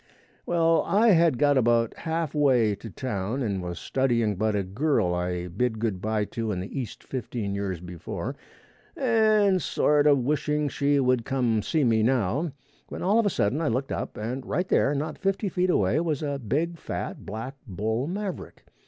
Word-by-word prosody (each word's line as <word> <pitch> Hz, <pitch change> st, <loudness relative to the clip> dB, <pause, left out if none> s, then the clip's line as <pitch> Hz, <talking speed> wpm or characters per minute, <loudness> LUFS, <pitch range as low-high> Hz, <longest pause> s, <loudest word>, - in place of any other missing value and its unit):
Well 165 Hz, -1 st, +3 dB
I 220 Hz, +4 st, +4 dB
had 165 Hz, -, +4 dB
got 145 Hz, -1 st, +4 dB
about 115 Hz, -1 st, +2 dB
half 165 Hz, -2 st, -2 dB
way 130 Hz, -8 st, +3 dB
to 105 Hz, +3 st, -8 dB
town 110 Hz, +3 st, -3 dB
and 100 Hz, -5 st, -1 dB
was 90 Hz, -1 st, -5 dB
a -, -, -8 dB
studying 120 Hz, -5 st, +1 dB
'bout 110 Hz, +2 st, 0 dB
a 100 Hz, -, 0 dB
girl 95 Hz, -, 0 dB
I 90 Hz, 0 st, -2 dB
bid 110 Hz, +6 st, -1 dB
good 105 Hz, -5 st, -2 dB
bye 110 Hz, 0 st, 0 dB
to 115 Hz, 0 st, -3 dB
in 95 Hz, -, -2 dB
the 95 Hz, +9 st, -5 dB
East 120 Hz, -, -8 dB
fifteen 115 Hz, -5 st, -4 dB
years 100 Hz, -3 st, -3 dB
before, 90 Hz, -1 st, -6 dB, 0.6 s
and 215 Hz, -6 st, +3 dB
sort 150 Hz, 0 st, +2 dB
a 145 Hz, -, +7 dB
wishing 150 Hz, +2 st, 0 dB
she 145 Hz, +1 st, +1 dB
could 125 Hz, -3 st, +1 dB
see 155 Hz, +5 st, +1 dB
me 115 Hz, -3 st, +3 dB
now, 130 Hz, -, +1 dB, 0.4 s
when -, -, -6 dB
all 205 Hz, +5 st, +3 dB
of 225 Hz, -, +3 dB
a -, -, +4 dB
sudden 130 Hz, -, 0 dB
I 165 Hz, -, 0 dB
looked 130 Hz, +4 st, -1 dB
up -, -, -4 dB
and 120 Hz, +5 st, -4 dB
right 180 Hz, +6 st, -1 dB
there, 145 Hz, -5 st, +2 dB
not 150 Hz, +2 st, -3 dB
fifty 195 Hz, +1 st, 0 dB
feet 180 Hz, +1 st, 0 dB
away, 110 Hz, -, +2 dB
was 160 Hz, -3 st, -1 dB
a 140 Hz, -1 st, -2 dB
big, 155 Hz, +8 st, -2 dB
fat, -, -, -5 dB
black 115 Hz, +6 st, -6 dB
bull 110 Hz, +7 st, -2 dB
maverick. 195 Hz, +1 st, -5 dB
130 Hz, 185 wpm, -26 LUFS, 110-155 Hz, 0.6 s, a